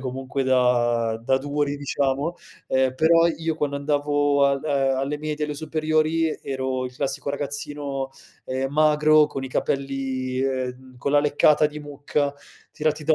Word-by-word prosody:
comunque 130 Hz, +1 st, -3 dB
da 120 Hz, -3 st, +2 dB
da 130 Hz, +3 st, +2 dB
duri 145 Hz, +1 st, -1 dB
diciamo, 140 Hz, +3 st, -1 dB, 0.3 s
ehm, 130 Hz, -1 st, +2 dB
però 165 Hz, +4 st, +5 dB
io 165 Hz, -1 st, -2 dB
quando 140 Hz, -2 st, -1 dB
andavo 145 Hz, 0 st, +1 dB
al 140 Hz, 0 st, 0 dB
a 135 Hz, -3 st, +1 dB
alle 140 Hz, +2 st, -2 dB
medie 150 Hz, 0 st, -3 dB
alle 150 Hz, -, -4 dB
superiori 155 Hz, +1 st, 0 dB
ero 130 Hz, -1 st, -2 dB
il 125 Hz, -, -10 dB
classico 140 Hz, +2 st, -3 dB
ragazzino, 140 Hz, -1 st, -4 dB, 0.3 s
ehm, 130 Hz, +1 st, -2 dB
magro 155 Hz, 0 st, +5 dB
con 135 Hz, -, -6 dB
i 130 Hz, -, -5 dB
capelli, 135 Hz, -1 st, -2 dB
ehm, 130 Hz, -1 st, -3 dB
con 140 Hz, -, -2 dB
la 145 Hz, -, +5 dB
leccata 150 Hz, +1 st, +4 dB
di 150 Hz, 0 st, -7 dB
mucca, 145 Hz, 0 st, -2 dB, 0.4 s
tirati 155 Hz, 0 st, -1 dB
da 160 Hz, +1 st, +4 dB
140 Hz, 150 wpm, -24 LUFS, 130-150 Hz, 0.4 s, però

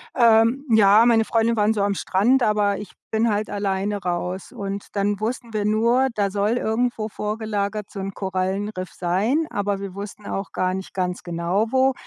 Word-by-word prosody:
Ähm, 230 Hz, +3 st, +4 dB
ja, 215 Hz, 0 st, +6 dB
meine 225 Hz, -2 st, +4 dB
Freundinnen 230 Hz, +1 st, +1 dB
waren 215 Hz, +1 st, +3 dB
so 210 Hz, -, -1 dB
am 200 Hz, 0 st, +1 dB
Strand, 230 Hz, +11 st, +2 dB
aber 210 Hz, -2 st, +2 dB
ich 205 Hz, -, -8 dB, 0.2 s
bin 225 Hz, +1 st, +1 dB
halt 210 Hz, 0 st, -1 dB
alleine 200 Hz, 0 st, -1 dB
raus. 180 Hz, +1 st, -3 dB
Und 200 Hz, -4 st, -5 dB
dann 200 Hz, 0 st, 0 dB
wussten 230 Hz, +1 st, -4 dB
wir 210 Hz, -1 st, 0 dB
nur, 235 Hz, +5 st, +3 dB
da 200 Hz, -1 st, +1 dB
soll 200 Hz, +2 st, 0 dB
irgendwo 225 Hz, -1 st, -1 dB
vorgelagert 210 Hz, -1 st, -3 dB
so 200 Hz, -, -8 dB
'n 195 Hz, 0 st, -4 dB
Korallenriff 190 Hz, 0 st, -3 dB
sein, 210 Hz, -, 0 dB
aber 205 Hz, -1 st, -1 dB
wir 195 Hz, -1 st, -7 dB
wussten 200 Hz, +1 st, -8 dB
auch 195 Hz, 0 st, -4 dB
gar 185 Hz, 0 st, 0 dB
nicht 190 Hz, 0 st, -6 dB
ganz 180 Hz, -1 st, -2 dB
genau, 175 Hz, +5 st, -1 dB
wo. 265 Hz, 0 st, +3 dB
205 Hz, 180 wpm, -23 LUFS, 195-225 Hz, 0.2 s, ja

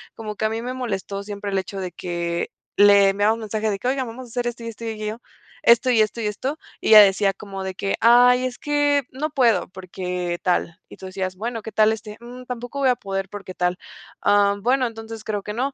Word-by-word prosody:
como 215 Hz, -2 st, -6 dB
que 220 Hz, -, -2 dB
a -, -, +2 dB
mí 225 Hz, +1 st, -3 dB
me 250 Hz, +1 st, -4 dB
molestó 200 Hz, -5 st, -4 dB
siempre 205 Hz, 0 st, -6 dB
el 195 Hz, -, 0 dB
hecho 195 Hz, +1 st, -6 dB
de 180 Hz, -2 st, -4 dB
que 170 Hz, -1 st, -3 dB, 0.3 s
le 200 Hz, -1 st, +7 dB
enviabamos 205 Hz, +3 st, +1 dB
mensaje 215 Hz, 0 st, -2 dB
de 195 Hz, -, -3 dB
que: 245 Hz, -, -3 dB
"Oigan, 260 Hz, 0 st, 0 dB
vamos 250 Hz, +3 st, -8 dB
a -, -, -16 dB
hacer 245 Hz, +1 st, -3 dB
esto, 235 Hz, -1 st, -5 dB
y -, -, -6 dB
esto 230 Hz, 0 st, -7 dB
y 225 Hz, -, -2 dB
aquello, 215 Hz, +2 st, -5 dB, 0.4 s
esto, 235 Hz, +2 st, +5 dB
y 235 Hz, -3 st, +4 dB
esto, 215 Hz, +2 st, -1 dB
y 210 Hz, -, -1 dB
esto". 265 Hz, +8 st, -3 dB, 0.2 s
Y -, -, -1 dB
ella 215 Hz, -1 st, +11 dB
decía 195 Hz, 0 st, +3 dB
como 195 Hz, -1 st, -8 dB
de 190 Hz, -1 st, -5 dB
que: 195 Hz, 0 st, -1 dB
"Ay, 245 Hz, +2 st, +6 dB
es 250 Hz, -1 st, -4 dB
que 290 Hz, -1 st, +1 dB
no 300 Hz, +4 st, -3 dB
puedo 245 Hz, -6 st, +2 dB
porque 180 Hz, -1 st, -4 dB
tal". 175 Hz, -2 st, 0 dB
Y -, -, -11 dB
tú 190 Hz, -, -10 dB
decías: 185 Hz, 0 st, -4 dB
"Bueno, 225 Hz, +3 st, -4 dB
¿qué 220 Hz, -, -8 dB
tal 215 Hz, 0 st, +4 dB
este?". 215 Hz, -1 st, -6 dB
"Mm, 250 Hz, +1 st, -10 dB
tampoco 245 Hz, +3 st, -6 dB
voy 265 Hz, -2 st, +3 dB
a 250 Hz, -, +3 dB
poder 195 Hz, -2 st, -4 dB
porque 195 Hz, -2 st, -8 dB
tal". 180 Hz, 0 st, -1 dB, 0.4 s
"Am, 200 Hz, 0 st, +3 dB
bueno, 255 Hz, +1 st, +2 dB
entonces 225 Hz, -1 st, -9 dB
creo 205 Hz, -2 st, -3 dB
que 210 Hz, -, -5 dB
no", 265 Hz, +4 st, -2 dB
215 Hz, 240 wpm, -22 LUFS, 195-240 Hz, 0.4 s, ella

